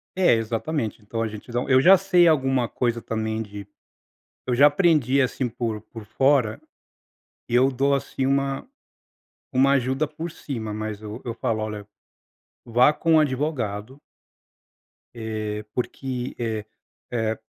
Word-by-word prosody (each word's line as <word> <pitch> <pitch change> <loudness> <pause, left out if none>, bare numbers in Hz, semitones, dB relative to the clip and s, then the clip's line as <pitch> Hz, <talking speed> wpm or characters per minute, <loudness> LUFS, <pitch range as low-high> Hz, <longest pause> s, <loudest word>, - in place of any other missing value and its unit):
É, 185 -9 +4
exatamente, 115 +2 -2
então, 115 +2 -4
a 115 - 0
gente 110 +3 -9
não 120 +2 -1
Eu 130 -1 +6
já 190 +5 +8
sei 180 -2 +4
alguma 135 -5 +2
coisa 120 -1 -1
também 110 0 -2
de 100 -2 -8 0.8
eu 125 - +1
já 140 +3 +7
aprendi 145 -4 +3
assim 130 0 -1
por 115 -2 -3
por 110 +1 -11
fora, 130 +1 +2 0.9
eu 125 +3 +3
dou 135 +2 +1
assim 135 -1 -3
uma 135 - 0 0.9
uma 135 +2 +4
ajuda 135 +2 +1
por 165 +3 -6
cima, 115 -9 -5
mas, 110 0 -4
eu 110 +3 -7
eu 115 - -4
falo: 115 -1 -1
"Olha, 105 -1 -5 0.8
vá 120 +4 +5
com 165 +1 +2
o - - +7
advogado" 130 -5 -2 1.1
"eh, 110 -2 -4
porque, 125 0 -4
eh, 110 -3 -2 0.5
é 110 -2 -1
125 Hz, 140 wpm, -24 LUFS, 110-140 Hz, 1.1 s, já